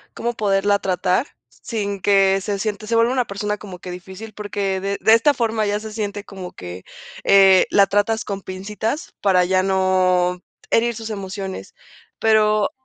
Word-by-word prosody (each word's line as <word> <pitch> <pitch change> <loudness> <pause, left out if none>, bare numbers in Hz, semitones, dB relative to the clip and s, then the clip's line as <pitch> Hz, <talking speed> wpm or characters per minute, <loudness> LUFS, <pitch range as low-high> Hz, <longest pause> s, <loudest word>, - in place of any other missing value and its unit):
cómo 240 +1 -2
poderla 200 -2 +1
tratar?, 185 - 0 0.2
sin 205 -4 -5
que 195 0 +4
se 200 +1 -2
siente 215 0 -3
se 230 - 0
vuelve 230 +2 +3
una 255 -2 +1
persona 210 +1 -3
como 190 -4 -9
que 180 - -8
difícil, 190 +4 -9
porque 200 -2 -3
de 200 0 -2
de 220 - +5
esta 230 +6 +5
forma 225 -2 0
ya 205 +1 0
se 215 0 -8
siente 205 -2 -4
como 190 -3 -8
que, 90 +1 -9 0.4
eh, 195 -1 +6
la 200 -1 +5
tratas 205 +3 0
con 200 -1 -4
pincitas 210 - -4
para 185 -3 +3
ya 185 +1 +2
no 185 -1 +1 0.3
herir 235 +1 +2
sus 225 0 -6
emociones, 195 - -6 0.4
pero 215 -1 +3
200 Hz, 170 wpm, -21 LUFS, 190-215 Hz, 0.4 s, eh